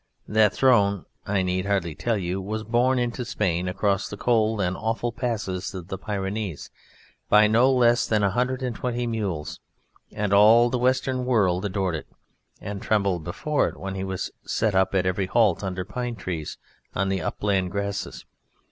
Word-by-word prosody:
That 110 -1 +4
throne 100 -8 +3 0.2
(I 100 -2 +1
need 90 +1 -1
hardly 95 -5 0
tell 115 +7 -1
you) 95 0 -2
was 110 +3 -4
borne 120 +4 +2
into 120 0 -1
Spain 90 -6 -1
across 100 +1 0
the 105 - -7
cold 110 -2 +1
and 95 -1 0
awful 115 +3 -2
passes 105 -7 -3
of 90 -1 -8
the 95 - -4
Pyrenees 100 -4 -4 0.6
by 105 0 +7
no 115 +5 +4
less 120 -2 +3
than 110 -2 +1
a 100 - +2
hundred 125 +4 -1
and 125 -3 -2
twenty 120 0 -2
mules, 95 -10 -3 0.5
and 105 -1 -1
all 115 +4 +6
the 125 - 0
Western 130 0 +1
world 100 -7 +2
adored 95 -3 -1
it, 80 - -5 0.5
and 100 -1 -6
trembled 100 -6 0
before 145 - 0
it - - -7
when 95 0 -5
it 95 0 -3
was 95 -1 -4
set 110 -2 0
up 95 +1 +2
at 95 -1 +2
every 95 +1 0
halt 105 -3 +2
under 90 -1 -3
pine 120 +4 -4
trees, 90 -6 -5 0.4
on 95 0 0
the 95 -2 -1
upland 95 +1 -1
grasses. 100 +1 -4
100 Hz, 175 wpm, -25 LUFS, 95-120 Hz, 0.6 s, by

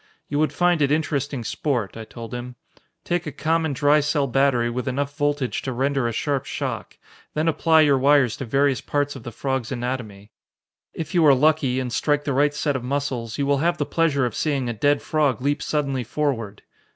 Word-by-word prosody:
"You 145 - -1
would 155 - +2
find 175 -2 +2
it 140 -1 +2
interesting 145 -4 -1
sport," 120 -4 -2
I 115 -1 -7
told 115 +1 -9
him. 125 0 -6 0.5
"Take 175 -1 -2
a - - -3
common 160 +2 0
dry 145 +2 +4
cell 145 -1 +1
battery 135 -2 +2
with 125 +3 -3
enough 140 +2 -2
voltage 145 -3 -1
to 130 - -4
render 135 0 0
a - - -1
sharp 140 +3 -1
shock. - - -5 0.4
Then 155 +2 0
apply 160 0 +4
your 140 -3 +4
wires 135 -3 +4
to 135 - -5
various 135 +2 +1
parts 145 0 -1
of 135 - -8
the 120 - -7
frog's 130 0 -3
anatomy. 120 -5 -5 0.6
If 160 -2 -5
you 175 -2 +4
are 140 - +7
lucky, 140 -2 +2
and 125 -2 -3
strike 145 -1 +1
the 140 - -1
right 145 +2 +2
set 145 -1 0
of 130 - -3
muscles, 130 -4 -3
you 140 - 0
will 140 0 +2
have 170 +3 +1
the - - -1
pleasure 155 -5 +1
of 120 - -2
seeing 140 -5 -1
a 120 - -2
dead 145 +6 +1
frog 145 -7 +1
leap 145 +3 0
suddenly 140 -4 -1
forward. 115 -6 -3
140 Hz, 205 wpm, -23 LUFS, 125-150 Hz, 0.6 s, are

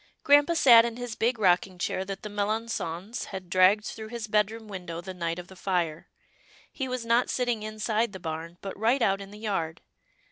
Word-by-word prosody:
Grampa 290 +4 +5
sat 240 -7 +8
in 235 0 -3
his 245 -2 -5
big 230 +3 0
rocking 185 -2 +2
chair 185 +1 -2
that 195 0 -7
the 210 - -5
Melangons 205 -1 -3
had 185 -2 -8
dragged 185 +4 +5
through 220 0 -6
his 235 0 -5
bed 210 -1 +3
room 225 0 -9
win 190 -3 -8
dow 165 0 -5
the 185 +2 -7
night 170 -2 -3
of 180 0 -8
the 190 - -13
fire. 175 -4 -2 0.6
He 265 - -4
was 255 -2 -3
not 235 +2 +3
sitting 245 -3 0
inside 215 +1 -1
the 190 - -8
barn, 165 +1 -6
but 195 - -6
right 235 +5 +2
out 195 -1 +2
in 195 - -9
the 205 - -11
yard. 180 -7 -2
210 Hz, 210 wpm, -27 LUFS, 185-230 Hz, 0.6 s, sat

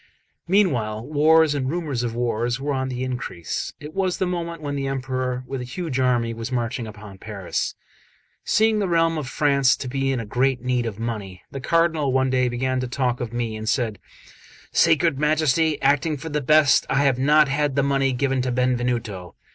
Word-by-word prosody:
Meanwhile 120 - +1
wars 155 +2 +4
and 135 -3 -1
rumours 155 -6 -2
of 120 -2 -3
wars 120 +1 -1
were 145 +1 -2
on 130 -1 -2
the 125 0 -3
increase; 120 -10 -4
it 150 +1 -9
was 190 -2 0
the 190 - 0
moment 170 -2 -3
when 145 -2 -4
the 135 -1 -2
Emperor 130 -1 -2
with 135 0 -5
a - - -4
huge 135 +2 -4
army 120 -3 +1
was 115 +2 -6
marching 120 -1 -2
upon 105 -2 -11
Paris. 100 -4 -4 0.7
Seeing 220 0 +2
the 200 - 0
realm 165 -2 +2
of 145 - -5
France 140 -2 +3
to 130 - -6
be 135 +1 -1
in 125 -4 -2
great 130 +3 +1
need 125 -2 0
of 105 -3 -5
money, 105 -5 -5
the 135 - -6
Cardinal 160 -2 +2
one 130 0 +2
day 125 -1 +2
began 130 +1 -1
to 125 - -2
talk 125 0 -1
of 120 -2 -4
me, 120 -2 -3
and 110 0 -4
said: 115 -7 -1 0.7
"Sacred 160 -3 +3
Majesty, 155 0 +2
acting 145 +2 +2
for 160 +4 -7
the 150 0 -1
best, 150 +1 +5
I 140 +1 +2
have 135 -3 +2
not 150 +2 +5
had 140 0 0
that 140 - +2
money 135 -1 +1
given 130 0 0
to 125 0 -1
Benvenuto. 120 -7 -1
130 Hz, 195 wpm, -23 LUFS, 120-150 Hz, 0.7 s, best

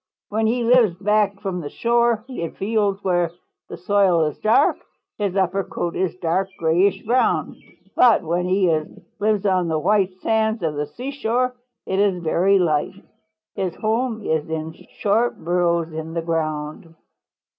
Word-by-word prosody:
When 220 +1 0
he 240 +2 0
lives 230 -6 +4
back 205 +1 +1
from 190 -3 -3
the 145 - -6
shore, 235 +1 +1
in 170 -11 -5
fields 205 -1 -1
where 175 -3 +1 0.4
the - - -7
soil 180 -2 +2
is 150 - -4
dark, 215 +1 +3 0.4
his 200 -3 -1
upper 195 0 +1
coat 170 -2 -4
is 185 -1 -1
dark 185 +2 0
grayish 170 +5 +2
brown, 245 +4 +1 0.4
but 235 -6 +5
when 170 +2 -1
he 185 -1 +2 0.5
lives 210 -1 +1
on 185 -3 +2
the 160 -1 0
white 190 +2 +1
sands 220 -2 +1
of 160 -2 0
the 145 0 -3
seashore 250 - -2 0.3
it 190 - -1
is 200 -2 +2
very 185 +5 +3
light. 160 -1 0 0.6
His 185 -3 -3
home 225 0 -1
is 160 -3 -1
in 160 0 -4 0.2
short 220 +4 +1
burrows 170 -1 0
in 160 +1 -6
the 165 - -2
ground. 155 0 -3
190 Hz, 155 wpm, -22 LUFS, 170-215 Hz, 0.6 s, but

